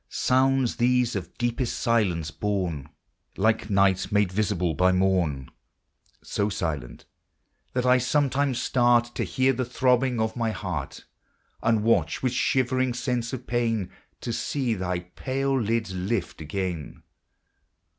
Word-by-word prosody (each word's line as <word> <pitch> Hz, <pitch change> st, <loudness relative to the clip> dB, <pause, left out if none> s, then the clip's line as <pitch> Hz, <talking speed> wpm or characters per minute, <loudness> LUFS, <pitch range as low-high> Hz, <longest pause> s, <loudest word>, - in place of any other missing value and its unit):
Sounds 130 Hz, -1 st, +2 dB
these 125 Hz, -1 st, +2 dB
of 90 Hz, -3 st, -6 dB
deepest 120 Hz, +1 st, -1 dB
silence 95 Hz, -10 st, +1 dB
born, 90 Hz, -5 st, -2 dB, 0.5 s
Like 110 Hz, +2 st, +1 dB
night 100 Hz, -2 st, +2 dB
made 105 Hz, -3 st, +2 dB
visible 90 Hz, -4 st, 0 dB
by 90 Hz, +3 st, +3 dB
morn; 90 Hz, -8 st, +1 dB, 0.7 s
So 100 Hz, +1 st, -1 dB
silent 75 Hz, -11 st, -4 dB, 0.7 s
that 125 Hz, 0 st, 0 dB
I 125 Hz, 0 st, +5 dB
sometimes 140 Hz, 0 st, +1 dB
start 120 Hz, -1 st, +2 dB
To -, -, -2 dB
hear 130 Hz, +1 st, +1 dB
the 130 Hz, +1 st, -1 dB
throbbings 125 Hz, 0 st, +1 dB
of 110 Hz, 0 st, -1 dB
my 115 Hz, -2 st, 0 dB
heart, 90 Hz, -9 st, -5 dB, 0.6 s
And 115 Hz, -2 st, +2 dB
watch, 115 Hz, +3 st, +1 dB
with 130 Hz, -1 st, +1 dB
shivering 130 Hz, -1 st, +1 dB
sense 125 Hz, -2 st, -2 dB
of 130 Hz, -1 st, -6 dB
pain, 115 Hz, -5 st, -1 dB, 0.3 s
To 120 Hz, -, -3 dB
see 130 Hz, -1 st, -1 dB
thy 90 Hz, -3 st, -2 dB
pale 135 Hz, +8 st, -2 dB
lids 110 Hz, -2 st, -1 dB
lift 95 Hz, -1 st, -2 dB
again. 85 Hz, 0 st, -4 dB
115 Hz, 130 wpm, -26 LUFS, 95-125 Hz, 0.7 s, I